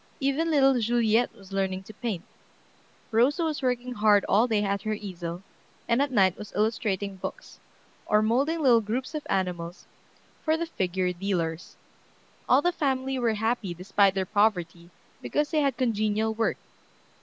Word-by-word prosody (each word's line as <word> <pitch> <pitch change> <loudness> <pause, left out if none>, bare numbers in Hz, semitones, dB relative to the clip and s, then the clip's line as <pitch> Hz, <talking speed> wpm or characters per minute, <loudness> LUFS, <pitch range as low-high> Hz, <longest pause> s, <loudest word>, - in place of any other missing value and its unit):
Even 285 +4 0
little 270 -4 +4
Juliette 230 0 +2
was 195 -1 -14
learning 190 -1 -1
to 215 - -12
paint. 210 -6 -4 0.9
Rosa 260 +9 +3
was 310 -3 -2
working 250 -1 -1
hard 210 -3 +4
all 220 +5 +4
day 215 -3 +1
at 200 -1 -1
her 215 +1 -2
easel, 180 -3 -6 0.4
and 235 +3 +2
at 285 - +1
night 195 -7 +3
was 210 - -8
illustrating 205 -2 -1
books, - - -8 0.5
or 210 0 +3
molding 275 +9 +1
little 240 -4 +5
groups 235 +7 -3
of 305 - -3
animals 180 -2 -2 0.6
for 315 0 +2
the 335 - -2
figure 185 - -1
dealers. 175 -3 -3 0.7
All 265 +3 +5
the 355 - +3
family 265 -5 -1
were 230 -3 +1
happy 220 -4 -1
despite 195 +2 +2
their 190 -1 0
poverty, 175 -5 0 0.3
because 295 0 -1
they 310 -2 +2
had 275 -4 0
congenial 220 -2 0
work. 225 +1 0
215 Hz, 155 wpm, -27 LUFS, 195-255 Hz, 0.9 s, little